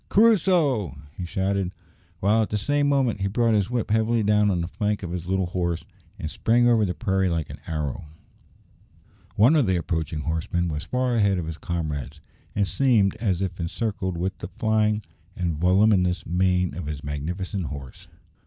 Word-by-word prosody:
"Crusoe!" 170 - +3 0.2
he 90 - -5
shouted, 95 +1 -1 0.5
while 105 +4 +3
at 110 - -1
the 105 - 0
same 145 +7 +1
moment 130 -7 +1
he 100 - +1
brought 115 +3 +2
his 105 -1 +2
whip 120 -4 -2
heavily 110 +1 +2
down 105 0 +3
on 90 -3 +1
the 85 - -2
flank 105 +4 -2
of 85 - -4
his 90 -1 -5
little 95 0 +1
horse, 85 -2 -2 0.3
and 80 - -5
sprang 120 +2 +3
over 115 -3 +4
the 90 - -2
prairie 95 -4 +1
like 85 -3 -2
an - - -9
arrow. 75 -3 -3 1.3
One 120 +10 +5
of 145 -6 +3
the 95 - +2
approaching 80 -2 -2
horsemen 80 +3 -1
was 75 +2 -4
far 125 +2 0
ahead 100 -4 +3
of 85 - -2
his 80 0 -6
comrades, 75 -4 -4 0.4
and 100 - +2
seemed 105 -2 +2
as 100 -5 0
if 95 -1 -4
encircled 95 +1 -2
with 95 +2 -2
the - - -5
flying 110 +1 +1 0.3
and 85 -3 -1
voluminous 90 0 +3
mane 90 0 +1
of 85 -3 -5
his 75 -1 -5
magnificent 85 +6 -3
horse. 70 -4 -9
95 Hz, 180 wpm, -25 LUFS, 85-110 Hz, 1.3 s, One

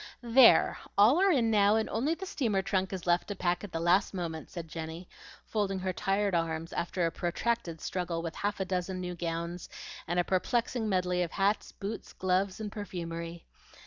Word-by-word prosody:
"There! 240 +1 +6 0.2
All 235 - +6
are 390 - +5
in 240 -10 +3
now, 205 0 +5
and 220 0 +1
only 275 +9 +1
the 385 - -6
steamer 230 - 0
trunk 190 -2 0
is 185 -3 -5
left 175 0 +2
to 205 - -4
pack 175 0 0
at 205 - -7
the 165 - -2
last 180 +4 +3
moment," 165 -3 -4
said 170 -2 -7
Jenny, 160 +2 -6 0.4
folding 200 -3 -1
her 185 0 -2
tired 195 +1 0
arms 165 -1 -1
after 175 0 -1
a 165 - 0
protracted 175 +1 -2
struggle 170 -2 -3
with 165 -2 -5
half 205 0 -2
a 190 - 0
dozen 185 0 -2
new 180 -1 -4
gowns, 170 0 -4 0.4
and 175 - 0
a - - +4
perplexing 225 +5 0
medley 180 -2 +1
of 170 -2 -2
hats, 200 +2 +1
boots, 210 +2 -6
gloves, 185 +1 0
and 210 -2 -4
perfumery. 170 -4 -6
185 Hz, 190 wpm, -30 LUFS, 170-210 Hz, 0.4 s, There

